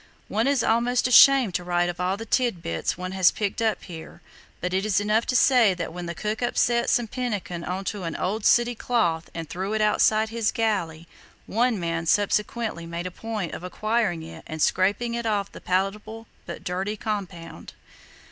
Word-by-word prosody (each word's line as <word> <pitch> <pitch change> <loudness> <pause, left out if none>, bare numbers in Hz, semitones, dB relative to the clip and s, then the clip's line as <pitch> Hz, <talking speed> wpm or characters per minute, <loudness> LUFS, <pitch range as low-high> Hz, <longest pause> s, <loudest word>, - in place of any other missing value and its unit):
One 220 +5 +1
is 280 -4 +2
almost 240 +2 +2
ashamed 255 -4 +7
to 175 - -2
write 175 0 +1
of 175 0 -5
all 185 +2 0
the 225 - -7
titbits 200 -12 -1
one 185 0 -5
has 190 -1 +4
picked 205 +1 -3
up 220 -2 0
here, 165 -3 -10 0.4
but 180 +1 -3
it 190 +1 +1
is 210 -1 +2
enough 210 +2 +1
to 255 - 0
say 245 -6 +5
that 170 -2 -5
when 175 0 -6
the 170 - -5
cook 215 +6 -3
upset 240 0 +1
some 240 - +2
pemmican 205 -8 -4
on 185 +3 -3
to 205 -1 -3
an 165 - -4
old 205 +4 -2
sooty 240 +2 +4
cloth 210 -9 0
and 165 -1 -5
threw 190 +6 -4
it 220 - 0
outside 215 +1 +3
his 225 -1 0
galley, 170 -8 -1 0.4
one 235 -1 +1
man 165 -1 -2
subsequently 205 -1 0
made 170 +1 -5
a 185 - -4
point 215 -3 -5
of - - -7
acquiring 210 -2 -1
it 165 - -10
and 155 - -6
scraping 205 +9 +1
off 205 -3 -1
the - - -11
palatable 210 +4 -2 0.2
but - - -7
dirty 190 +3 -3
compound." 180 -7 -6
205 Hz, 185 wpm, -25 LUFS, 175-225 Hz, 0.4 s, ashamed